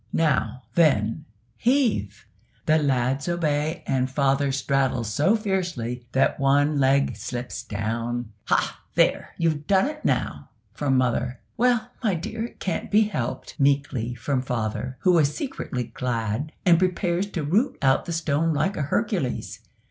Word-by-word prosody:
Now, 145 -5 +1
then, 145 -3 +2 0.3
heave!" 230 - +1 0.4
The 155 +1 +4
lads 135 +1 0
obey, 155 -3 -1
and 130 -1 0
father 140 0 +1
straddles 135 -5 0
so 175 +10 +3
fiercely 175 - -2
that 135 - +2
one 145 +2 +3
leg 135 -2 +3
slips 120 +3 -5
down. 115 +1 -3
"Hah! - - +1 0.2
there, - - +2
you've 155 -3 0
done 190 +1 +4
it 300 +1 -7
now!" - - -1 0.2
from 135 -3 +1
mother. 125 0 0 0.2
"Well, 245 0 +2
my 205 -5 +2
dear, 220 +7 -4
it - - -12
can't 185 - -3
be 215 +1 +5
helped," 130 - -4
meekly, 140 -4 +1
from 125 +3 -1
father, 125 0 -3
who 180 -2 +4
is 145 -1 +2
secretly 140 - -3
glad, 120 +3 -2
and 170 -2 +6
prepares 180 0 0
to 165 - -2
root 205 - +1
out 135 -1 +3
the - - -4
stone 160 -1 0
like 190 +7 0
a - - -2
Hercules. 170 - -1
140 Hz, 145 wpm, -25 LUFS, 125-170 Hz, 0.4 s, and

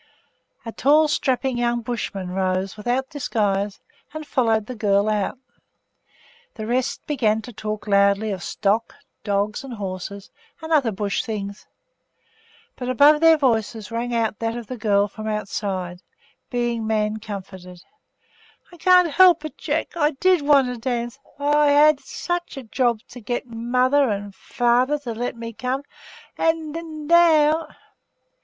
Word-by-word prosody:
A 230 - -5
tall, 300 +6 +4
strapping 260 -3 0
young 240 0 0
Bushman 210 -5 -4
rose, 185 0 -1
without 245 +5 -2
disguise, 205 -8 -1 0.4
and 310 0 -5
followed 225 -6 +1
the 255 - -6
girl 205 -2 +1
out. 210 +3 -1 1.2
The 215 - -6
rest 245 +3 -1
began 225 -7 0
to 245 - -10
talk 215 0 -5
loudly 200 +1 +3
of 190 -3 -4
stock, 210 +5 -1 0.3
dogs, 205 +3 -1
and 260 -3 -7
horses, 195 0 -6 0.3
and 320 0 -8
other 275 -7 +3
Bush 200 0 -2
things; 200 -2 -6 1.1
but 250 -1 -5
above 290 +4 +5
their 325 -1 +7
voices 225 -5 0
rang 235 +1 -3
out 225 -3 -1
that 230 +1 -2
of 240 - -7
the 255 - -6
girl 205 -3 +2
from 215 +2 -9
the 215 - -1
outside 190 -4 -4 0.5
being 240 -2 -1
man 215 -1 0
comforted 190 -4 -9 0.9
'I - - -13
can't 360 -1 +5
help 355 0 +5
it, 310 - -7
Jack! 315 +2 -3
I 305 -2 +2
did 370 -3 +4
want 285 -2 +4
to 250 -1 -5
dance! 240 +1 -3 0.2
I 285 - -5
I 295 0 +4
had 295 0 +5
such 345 +6 -4
such - - -12
a 270 - -6
job 235 -1 0
to 250 - -10
get 240 +4 -3
mother 250 +4 +1
and 205 -1 -2
and 200 -1 -11
father 245 +4 +1
to 255 -5 -6
let 240 +2 -3
me 230 0 -7
come 255 +5 -3 0.6
and 325 -2 0
and 315 -3 -7
now! 320 -2 +4
235 Hz, 155 wpm, -22 LUFS, 210-285 Hz, 1.2 s, their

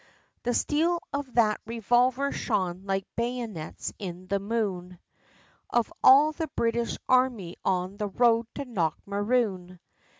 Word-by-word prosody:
The 245 0 -1
steel 335 +4 +1
of 280 -2 -3
that 215 -3 +3
revolver 245 +4 +2
shone, 185 -1 -2
like 195 -1 -1
bayonets 235 -8 -4
in 180 -2 -6
the 200 +1 0
moon, 195 -4 -3 0.7
Of 240 -2 0
all 285 +4 +8
the 320 +1 -4
British 235 0 0
army 250 -9 +2
on 185 +1 -1
the 210 - -2
road 230 +2 +3
to 280 - -4
Knockmaroon! 200 -1 -1
225 Hz, 125 wpm, -27 LUFS, 190-250 Hz, 0.7 s, all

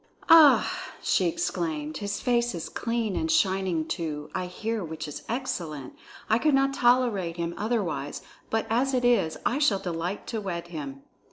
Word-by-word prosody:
"Ah!" 320 -3 +8 0.4
she - - +2
exclaimed, 165 - -2
"his 205 0 -3
face 240 -3 +1
is 165 - -5
clean 230 -4 -2
and 320 - -1
shining 190 - +1
too, 150 -3 -4
I 185 -1 -2
hear, 220 +4 -3
which 160 -1 -6
is 150 - -7
excellent. 170 - -4 0.3
I 220 +2 +3
could 300 0 +3
not 275 0 +2
tolerate 240 -10 +2
him 170 0 -2
otherwise; 195 - -2 0.3
but 225 0 0
as 260 +4 +1
it 245 -1 +1
is, 235 -10 +2
I 270 - +1
shall 260 -10 +3
delight 175 +1 -4
to 225 -2 -3
wed 175 -3 -5
him." 140 -4 -7
195 Hz, 165 wpm, -27 LUFS, 165-240 Hz, 0.4 s, Ah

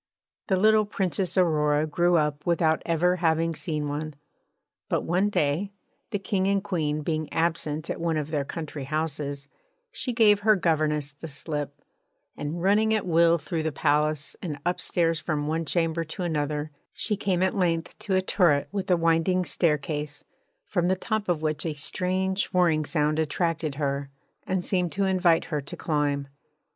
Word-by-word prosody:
The 190 - +2
little 215 +2 +4
Princess 190 -2 -2
Aurora 150 -4 +3
grew 175 +3 +2
up 150 -1 0
without 165 -2 +2
ever 175 +2 +2
having 165 -1 +1
seen 155 -3 -3
one. 150 +1 -4 0.7
But - - 0
one 185 +4 +1
day 175 +3 0 0.4
the 215 - -1
King 195 -1 -1
and 195 0 +1
Queen 155 -7 -1
being 155 -1 -2
absent 160 -2 -1
at - - -4
one 165 -2 0
of 155 0 -3
their 145 -3 0
country 150 -1 -6
houses 145 -2 -3 0.4
she 255 - -3
gave 215 -4 +5
her 215 +1 +4
governess 155 -5 0
the 145 +3 -9
slip, 145 -1 -5 0.5
and 160 +4 -4
running 215 +3 +3
at 215 - -1
will 170 -1 +4
through 160 +1 -3
the 160 0 -1
palace 150 0 +1
and 155 -5 -4
upstairs 170 -2 0
from 155 -2 -2
one 160 +2 -1
chamber 165 0 0
to 165 +3 -6
another, 150 -2 -2 0.2
she 210 - -2
came 190 -3 0
at 190 - +1
length 170 -3 0
to 195 - -1
a 185 - +2
turret 170 -7 +2
with 195 -2 -3
a 180 - +4
winding 165 +2 +2
staircase, 150 -3 -1 0.4
from 175 -2 0
the 185 - +3
top 215 +1 -2
of 160 -3 0
which 155 -1 0
a 160 -3 -3
strange 185 +5 0
whirring 170 -4 +2
sound 150 +1 +1
attracted 160 -1 -1
her 140 -1 -2 0.4
and 185 -1 -1
seemed 180 -3 0
to 200 - 0
invite 180 -3 +3
her 150 - 0
to 140 - -9
climb. 145 -3 0
165 Hz, 170 wpm, -26 LUFS, 150-185 Hz, 0.7 s, gave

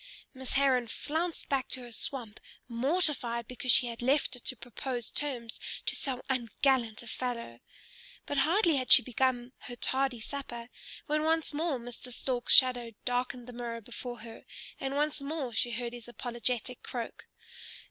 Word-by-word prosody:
Miss 260 -1 -4
Heron 265 -3 +4
flounced 320 +8 -2
back 270 -2 +1
to 260 - -3
her 240 -1 -9
swamp, 230 -2 -4 0.3
mortified 245 -2 +2
because 255 0 +1
she 250 - +7
had 235 -1 -5
left 265 +1 +3
it 250 - -8
to 255 - -1
propose 245 -1 -4
terms 245 -6 -2 0.3
to - - +2
so 260 -3 -1
ungallant 245 -2 +1
a - - -12
fellow. 235 - -4 0.7
But 285 - 0
hardly 335 +1 +4
had 255 -1 -1
she - - +10
begun 250 0 0
her 245 - -8
tardy 265 0 +1
supper 240 -1 -6 0.4
when 305 +1 +1
once 320 -1 +1
more 310 -1 0
Mr. 245 +1 -7
Stork's 245 0 +3
shadow 245 -3 +5
darkened 245 0 -1
the 250 - -9
mirror 235 -1 -4
before 240 +1 -7
her, 225 0 -10 0.3
and 270 0 -2
once 295 0 0
more 280 -4 -3
she 230 +2 +3
heard 235 0 -3
his 240 -1 -9
apologetic 245 0 -2
croak. 235 -2 -6
250 Hz, 160 wpm, -31 LUFS, 235-275 Hz, 0.7 s, she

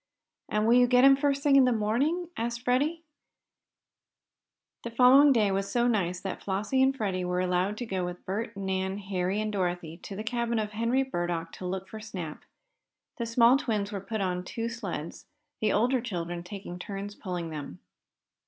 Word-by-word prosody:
"And 210 0 +1
will 230 - +5
you 245 0 +6
get 250 +1 +5
him 275 0 +8
first 280 0 0
thing 285 -2 +5
in 265 - +7
the 250 - +3
morning?" 265 +11 0
asked 235 +1 -3
Freddie. 290 +7 +1 1.8
The 235 - -5
following 255 +5 +7
day 215 -6 +3
was 195 +1 -1
so 240 0 +2
nice 180 -6 0
that 195 - -5
Flossie 210 +7 0
and 270 +1 +3
Freddie 190 -5 -1
were 180 0 -1
allowed 185 +3 0
to 245 - -4
go 190 -4 -2
with 180 0 -6
Bert, 200 +2 -3
Nan, 190 0 -2
Harry 190 0 -2
and 215 0 -1
Dorothy 175 -4 -2
to 195 - -9
the 215 - -4
cabin 235 0 -1
of 210 -1 -1
Henry 230 +5 +1
Burdock 175 -8 -3
to 185 - -7
look 190 +1 -4
for 220 - -8
Snap. 180 -8 -7 0.7
The 235 - -2
small 235 +2 +5
twins 215 -7 -2
were 200 -2 -4
put 220 +2 -4
on 180 -1 -1
two 230 +5 -4
sleds, 195 -9 -6 0.3
the 215 - +1
older 245 +4 +2
children 175 -6 -4
taking 180 -1 -8
turns 200 +2 -6
pulling 175 -5 -5
them. 145 - -7
210 Hz, 185 wpm, -28 LUFS, 185-240 Hz, 1.8 s, him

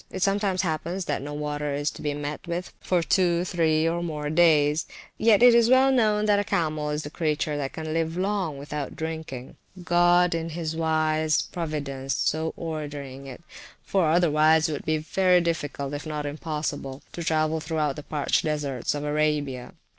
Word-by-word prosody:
It 190 - -3
sometimes 195 -2 +1
happens 170 +2 -2
that - - -2
no 145 +2 -6
water 150 -1 -3
is 145 +1 -1
to - - -11
be 145 -1 -2
met 145 +3 -5
with 175 +1 -4
for 180 -2 0
two, 175 0 +2
three, 160 -3 +1
or 170 +1 -1
more 150 -3 -3
days; 155 -2 +4
but - - -17 0.3
yet 220 0 +6
it 245 -1 +9
is 235 0 +5
well 260 +1 +5
known 215 -4 +2
that 205 -1 +3
a - - +1
camel 155 -5 -1
is 150 0 -3
a 145 - -7
creature 155 -2 -1
that 135 -2 -3
can 155 -1 -5
live 165 +1 -1
long 190 -6 -1
without 145 0 -5
drinking 160 -5 -6 0.3
(God 175 +1 +4
in 165 0 -2
his 160 -1 -4
wise 155 -1 +1
providence 140 -5 -4
so 160 +1 0
ordering 145 -4 -6
it: 135 +5 -10 0.4
for 185 -5 +1
otherwise 160 -1 +4
it 155 - -3
would 145 - -6
be 155 0 +1
very 180 +4 +3
difficult, 145 -5 -2
if 145 +2 -5
not 150 -1 -3
impossible 145 -2 -4
to 170 - -6
travel 160 0 +1
through 155 -2 -1
the 150 - -8
parched 145 -1 0
deserts 145 -4 -2
of 145 - -4
Arabia). 150 -4 -1
155 Hz, 185 wpm, -25 LUFS, 150-175 Hz, 0.4 s, it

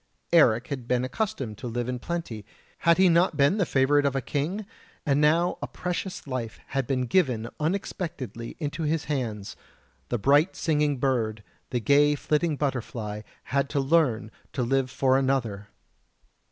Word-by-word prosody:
Eric 125 -7 +5
had 130 -5 -5
been 125 0 +1
accustomed 130 - -3
to 125 - -5
live 120 +1 -2
in 125 -1 -3
plenty; 125 -9 -4 0.4
had 170 0 +4
he 190 0 +6
not 170 -2 +3
been 145 +9 +3
the 185 - +2
favourite 145 +2 +3
of 140 -1 +1
a - - +2
king? 165 +11 -2 0.4
And 140 0 +2
now 165 +4 +3
a - - -3
precious 180 +1 -4
life 130 -5 -4
had 135 -2 -1
been 130 -2 0
given 125 -6 +1
unexpectedly 155 - -3
into 155 +1 -4
his 160 0 0
hands 115 -9 -3 0.5
the 120 - 0
bright 145 - +3
singing 150 -3 +1
bird, 115 -5 0 0.3
the 125 - -1
gay 145 +4 +4
flitting 150 +2 0
butterfly 115 -6 -3 0.2
had 140 +1 0
to 145 - 0
learn 135 -7 +2 0.2
to 130 - -1
live 135 +1 +1
for 130 0 +2
another! 120 -7 -1
135 Hz, 160 wpm, -26 LUFS, 120-155 Hz, 0.5 s, he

